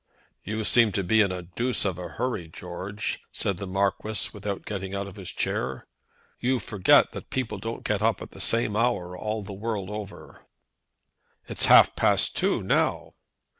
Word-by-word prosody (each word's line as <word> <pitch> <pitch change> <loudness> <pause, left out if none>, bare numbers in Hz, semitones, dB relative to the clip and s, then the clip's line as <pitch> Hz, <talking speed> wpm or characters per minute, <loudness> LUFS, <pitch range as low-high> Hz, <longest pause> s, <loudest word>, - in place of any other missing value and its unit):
"You 110 +2 -3
seem 115 0 +4
to 100 - 0
be 110 +5 +4
in 100 -3 +2
a 90 -1 -5
deuce 115 +9 0
of 90 -3 -1
a 90 - -5
hurry, 115 -10 -3
George," 90 +5 -5
said 100 -3 -2
the 100 - -5
Marquis, 100 +2 0
without 100 -1 -5
getting 95 -2 -4
out 100 0 -2
of 100 - -10
his 95 -4 -6
chair. 65 +1 -2 0.5
"You 130 +2 +1
forget 105 -5 +4
that - - -9
people 115 -6 -3
don't 115 +3 -5
get 105 -1 -1
up 110 +1 +2
at - - -9
the - - -7
same 115 -2 +2
hour 105 -6 0
all 110 +2 -3
the 100 0 -8
world 105 -1 -4
over." 105 -1 -9 1.0
"It's - - +3
half - - +7
past - - +2
two - - +1
now." - - 0
100 Hz, 175 wpm, -26 LUFS, 95-110 Hz, 1.0 s, half